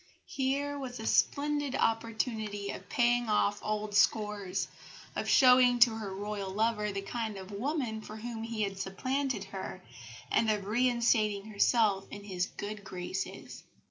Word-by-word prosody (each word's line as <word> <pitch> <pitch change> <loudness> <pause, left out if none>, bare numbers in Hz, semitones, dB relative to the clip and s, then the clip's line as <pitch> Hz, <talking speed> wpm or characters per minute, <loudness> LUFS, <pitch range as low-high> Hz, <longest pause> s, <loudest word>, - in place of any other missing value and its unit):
Here 280 +2 -1
was 250 -3 -6
a 220 - -5
splendid 290 +1 +1
opportunity 220 -2 -1
of - - -9
paying 240 -1 +2
off 205 -1 +2
old 215 0 -2
scores, 205 -2 +1 0.5
of - - -2
showing 250 -1 +6
to 240 0 +7
her 220 -3 -5
Royal 205 -1 -4
lover 210 +1 0
the 195 0 -4
kind 220 -1 -3
of 190 +1 -9
woman 235 0 -2
for 215 - -9
whom 225 0 -5
he 225 -1 -2
had 195 -1 -3
supplanted 260 +8 -2
her, - - -6 0.5
and 225 - +3
of 210 -2 0
reinstating 225 -3 +2
herself 205 -2 +3
in 205 - -8
his 185 -3 -2
good 205 0 -6
graces. 185 0 -5
220 Hz, 145 wpm, -31 LUFS, 205-245 Hz, 0.5 s, to